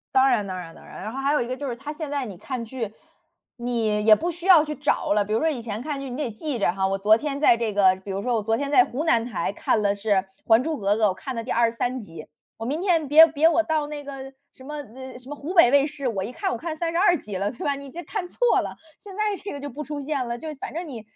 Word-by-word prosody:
当 265 +1 +6
然 215 -5 +1
当 185 -1 -4
然 165 -2 -8
当 - - -16
然， - - -10
然 215 - -4
后 265 - -5
还 275 +2 +1
有 300 - +2
一 235 - -3
个 255 +1 -4
就 285 - -4
是 240 - -3
它， 275 +5 -7
现 305 -1 -6
在 285 -2 -1
你 195 -5 -8
看 250 +4 -5
剧， 230 -2 -5 0.7
你 240 -1 -2 0.2
也 215 -1 +8
不 345 +9 -2
需 345 +2 -9
要 345 -5 +8
去 300 -1 -4
找 290 -7 0
了。 205 0 +3
比 210 - -3
如 220 - +2
说 320 - +2
以 270 -6 -3
前 220 -1 -5
看 290 +1 -4
剧 275 -1 -6
你 245 - -5
得 275 -4 -2
记 260 +4 -4
着 200 - +2
哈， 190 +1 0
我 195 0 -1
昨 215 +3 +5
天 280 +1 -3
在 260 -5 +5
这 225 -3 -1
个 190 -2 +4
比 195 +1 -8
如 195 +1 -3
说 250 - 0
我 220 - +1
昨 225 +2 +1
天 280 +4 -3
在 370 +5 +6
湖 270 +5 -4
南 235 -8 +3
台 195 -5 -2
看 215 - 0
了 200 -1 +2
是 205 +2 -6 0.4
《还 225 +2 +5
珠 315 -1 -2
格 200 -1 +1
格》， 220 - -1
我 185 - -1
看 250 +7 -6
了 230 - -3
第 250 - -5
23 235 +2 +1
集。 165 -8 -10 0.3
我 225 - -6
明 295 +7 -2
天 335 -6 +1
别 315 +3 +9
别 315 +1 +3
我 335 0 +3
到 310 -2 0
那 295 -1 -7
个 270 -1 -7 0.2
什 260 - -15
么， 300 +2 -7 0.2
呃， 260 -1 -9
什 250 - -14
么 295 - -6
湖 300 +6 -6
北 335 -10 +7
卫 280 +1 +5
视， 290 -3 -4
我 195 -5 -2
一 220 - -5
看 385 +9 -2
我 - - -2
看 330 -1 -4
32 345 +2 +2
集 205 -2 -7
了， 200 +2 -1
对 240 - -8
吧？ 285 -1 +1
你 275 -1 -9
这 345 - -7
看 405 -5 -3
错 - - +2
了， - - -5 0.3
现 400 -2 -11
在 425 -1 0
这 400 - -5
个 285 - -6
就 285 +1 -6
不 295 +5 -6
出 295 0 -5
现 280 -2 -2
了， 235 0 -4
就 320 - -8
是 305 - -5
反 270 - -7
正 340 +1 -4
你， 240 -7 -7
265 Hz, 325 characters per minute, -24 LUFS, 225-300 Hz, 0.7 s, 别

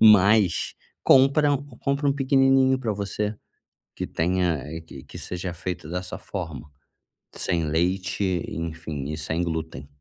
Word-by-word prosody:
Mas 105 -3 +5 0.3
compra 140 +2 +6
u 140 - +1 0.2
compra 140 +1 0
um 140 - +4
pequenininho 135 -1 +4
para 115 -5 -1
você, 105 +1 -2 0.6
que - - -3
tenha, 90 -1 +1
eh, 80 +2 -6
que 70 -5 -11
que - - -11
seja 90 0 -5
feito 85 -1 -5
dessa 90 +1 -4
forma. 80 -6 -6 0.6
Sem 85 -1 -1
leite, 90 +6 0 0.3
enfim, 80 -4 -4
e 75 - -4
sem 80 +3 -1
glúten. 80 -5 -4
90 Hz, 140 wpm, -25 LUFS, 80-110 Hz, 0.6 s, compra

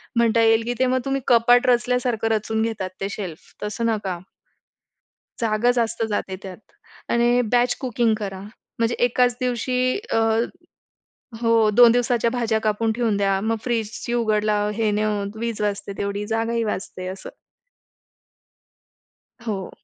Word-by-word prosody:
म्हणता 230 -1 +3
येईल, 225 0 +4
की 240 - -1
ते 260 - +4
मग 255 +1 +1
तुम्ही 275 0 -1
कपाट 245 0 +5
रचल्यासारखं 245 -1 +1
रचून 220 +1 -1
घेतात. 220 -4 -2
ते 195 - -1
शेल्फ 185 -6 -7
तसं 210 +2 -3
नका, 205 -5 -2 1.2
जागा 225 +1 +2
जास्त 230 -1 0
जाते 195 -2 -2
त्यात. 185 -2 -8 0.5
आणि 240 +1 +3
बॅच 245 0 +3
कुकिंग 240 -3 +1
करा, 195 -2 -5 0.4
म्हणजे 230 +1 +1
एकाच 245 0 +2
दिवशी, 250 0 -1 0.3
अ, - - +2 1.2
हो. 230 -2 +3
2 240 0 +8
दिवसाच्या 240 -1 +1
भाज्या 230 -2 0
कापून 220 +1 +1
ठेवून 230 -4 +1
द्या. 195 -1 +1
मग 225 +2 0
फ्रिजची 235 0 -2
उघड-लाव 215 -2 +1
हे 220 -2 +1
न 210 - 0
होऊन 205 -2 -1
वीज 230 -2 -3
वाचते. 205 -1 -2
तेवढी 200 +1 -3
जागाही 225 +1 -1
वाचते 185 -3 -4
असं. 190 +1 -7 2.2
हो. 195 -5 -3
225 Hz, 140 wpm, -22 LUFS, 210-240 Hz, 2.2 s, 2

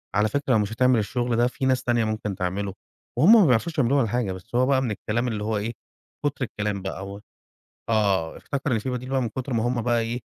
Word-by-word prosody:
"على 105 +1 +3
فكرة 140 -3 0
لو 110 - +4
مش 105 +1 -1
هتعمل 125 -1 +3
الشُغل 120 +2 -1
ده، 120 +1 +3
في 130 +1 -4
ناس 130 -1 +2
تانية 120 -2 +1
ممكن 110 -2 -3
تعمله." 95 +1 -2 0.4
وهُم 195 +9 +7
ما 185 - +6
بيعرفوش 140 +7 +1
يعملوه 140 +1 +3
ولا 115 - +2
حاجة، 115 -3 -1
بس 95 +6 -8
هو 130 +1 +4
بقى 135 -1 +3
من 120 - -1
الكلام 115 +4 -2
اللي 105 -3 -2
هو 110 0 -1
إيه، 110 +3 -3 0.5
كُتر 140 -3 0
الكلام 105 -3 -3
بقى 95 0 -5
أو 100 +1 -7 0.7
آه. 100 -7 +1
افتكر 140 -1 -3
إن 115 - +2
في 130 +5 -3
بديل 125 +1 -4
بقى 135 -1 +1
من 120 - -1
كُتر 130 +4 -5
ما 115 -1 +1
هم 120 -1 0
بقى 120 0 +2
إيه، 115 +2 -3
115 Hz, 245 wpm, -25 LUFS, 105-130 Hz, 0.7 s, وهُم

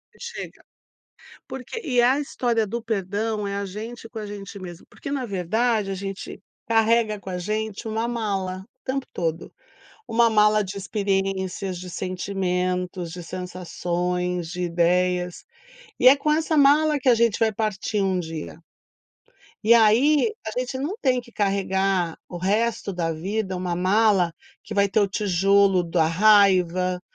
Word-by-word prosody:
E - - -22
chega. 475 0 -8 0.9
Porque 265 - -6
e 250 -4 +2
a 255 +4 +4
história 240 -6 0
do 235 +4 -4
perdão 210 0 -2
é 200 - -3
a 200 0 -2
gente 225 +5 -7
com 225 - -7
a 215 - -5
gente 205 0 -8
mesmo, 175 -2 -9
porque - - -9
na 275 -3 -2
verdade 215 +2 0
a - - -1
gente 195 +1 -6 0.3
carrega 225 -1 +2
com 195 - -9
a 180 - -3
gente 215 +4 -3
uma 220 +1 -1
mala. 195 -5 -2 0.2
O - - -
tempo 265 0 -2
todo. 165 -1 -3 0.5
Uma 230 0 +4
mala 210 -1 +4
de 195 +1 -6
experiências, 195 -2 -2
de 180 0 -8
sentimentos, 180 -1 -2
de 175 +1 -7
sensações, 180 0 -3
de 180 +1 -5
ideias, 180 +1 +1 0.6
e 255 - +6
é 265 - +9
com 300 +2 0
essa 315 0 +1
mala 295 +2 +5
que 265 - -4
a - - +7
gente 230 -2 +2
vai 220 -1 +2
partir 210 0 -1
um 190 -1 +1
dia. 160 - -6 1.1
E 225 - +7
aí, 250 - +4
a 220 +3 -3
gente 255 +1 -3
não 295 +9 -3
tem 255 -3 +2
que 240 -1 -13
carregar 195 -4 0
o 175 - -6
resto 210 +3 0
da 170 -2 -1
vida 190 +4 -3
uma 180 -1 -2
mala 190 -1 +3 0.3
que 210 - -7
vai 200 -1 +3
ter 200 - +1
o 205 - +3
tijolo 195 -1 +3
da 165 -1 +1
raiva, 185 -1 +4
200 Hz, 160 wpm, -24 LUFS, 180-225 Hz, 1.1 s, é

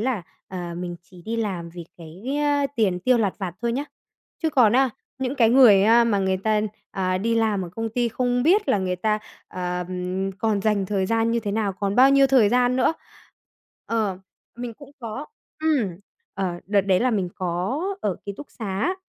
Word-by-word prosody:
là, 230 -5 -1 0.3
ờ, 175 -2 -5
mình 175 0 -5
chỉ 180 -1 -16
đi 230 +4 -3
làm 185 -7 -3
vì 170 0 -9
cái, 165 +4 -12 0.2
á, 290 -1 +2
tiền 190 -6 +1
tiêu 250 +4 +3
lặt 200 -4 +1
vặt 185 -4 -4
thôi 235 0 0
nhá. 280 +4 -2 0.6
Chứ 320 - +1
còn 240 -7 +4
á, 260 0 +3 0.3
những 265 +1 -2
cái 230 -5 +4
người 235 -6 +7
á 235 +2 +6
mà 210 -4 +1
người 190 -1 +1
ta, 215 +2 +1 0.3
à, 185 -1 -1
đi 230 +3 0
làm 215 -4 +1
ở 175 - -7
công 225 +6 -4
ty 240 +1 0
không 245 +1 0
biết 385 +7 +3
là 205 - +3
người 185 -1 -1
ta, 215 +3 0 0.3
ờm, 180 +1 -3
còn 215 -2 +1
dành 205 -2 +1
thời 195 -2 0
gian 230 +1 +1
như 235 0 +1
thế 205 -2 -3
nào, 210 -3 0
còn 200 +2 -2
bao 265 +2 +7
nhiêu 275 0 +6
thời 255 -6 +5
gian 245 +1 +2
nữa. 260 +5 +2 0.9
Ờ, 215 -5 -1 0.4
mình 240 -2 -6
cũng 285 +2 -14
có. 235 +5 -6 0.3
Ừm, 260 - +1 0.4
ờ, 180 -3 -3
đợt 200 0 +3
đấy 190 -1 +2
là 255 0 +2
mình 195 -5 0
có 185 - -2 0.2
ở 195 -4 -1
ký 200 - -3
túc 290 - -9
xá 215 - -2
215 Hz, 205 wpm, -24 LUFS, 185-245 Hz, 0.9 s, người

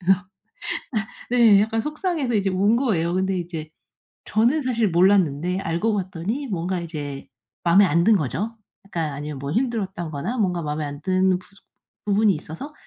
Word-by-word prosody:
그래서 190 +1 +3 1.1
네 230 -5 +6
약간 225 +2 +1
속상해서 305 - -2
이제 200 -2 +2
운 200 +4 +3
거예요. 180 -10 +1
근데 190 0 0
이제 165 -3 -6 0.5
저는 240 +8 +2
사실 235 -4 +1
몰랐는데 180 -2 +3
알고 170 +6 0
봤더니 195 - -3
뭔가 180 -1 -2
이제 145 -5 -6 0.4
마음에 180 +4 +6
안 170 -2 +2
든 220 +2 +6
거죠. 185 - -2 0.3
약간 165 -6 -3
아니면 145 0 -6
뭐 140 +1 -4
힘들었다거나 190 - -2
뭔가 180 -5 0
마음에 150 +1 -2
안 145 +1 -7
드는 185 0 +2 0.7
부분이 205 +1 +4
있어서 165 - -8
185 Hz, 325 characters per minute, -23 LUFS, 165-220 Hz, 1.1 s, 네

